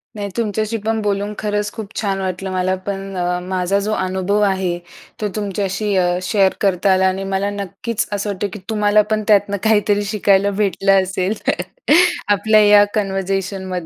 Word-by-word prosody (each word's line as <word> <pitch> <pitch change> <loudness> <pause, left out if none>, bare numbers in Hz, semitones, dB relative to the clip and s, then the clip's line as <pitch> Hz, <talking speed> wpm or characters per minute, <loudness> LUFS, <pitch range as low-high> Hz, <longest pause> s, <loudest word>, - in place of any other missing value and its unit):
नाही 205 -1 -4
तुमच्याशी 220 0 -1
पण 220 +1 -2
बोलून 205 0 -1
खरंच 210 -1 -2
खूप 220 -2 -8
छान 195 -2 -1
वाटलं 190 0 -3
मला 185 0 0
पण 195 -1 -4
अ, 180 0 -1
माझा 185 +1 -1
जो 205 +2 -2
अनुभव 190 +1 0
आहे 190 -2 -1 0.4
तो 210 - 0
तुमच्याशी 200 0 -2
अ, 175 -1 +2
शेअर 195 -1 +2
करता 195 0 +2
आला 190 0 +3
आणि 190 +1 -1
मला 195 +1 0
नक्कीच 205 +3 -3
असं 205 +1 -2
वाटतं 200 0 -2
की 210 - -7
तुम्हाला 210 -1 +3
पण 215 0 +1
त्यातनं 205 -1 +3
काहीतरी 210 -1 +2
शिकायला 200 -1 +2
भेटलं 195 -1 +3
असेल, 185 +1 -1 0.9
आपल्या 210 +1 +4
या 205 0 +7
कन्व्हर्सेशनमधनं 195 -1 -2
200 Hz, 160 wpm, -19 LUFS, 190-210 Hz, 0.9 s, या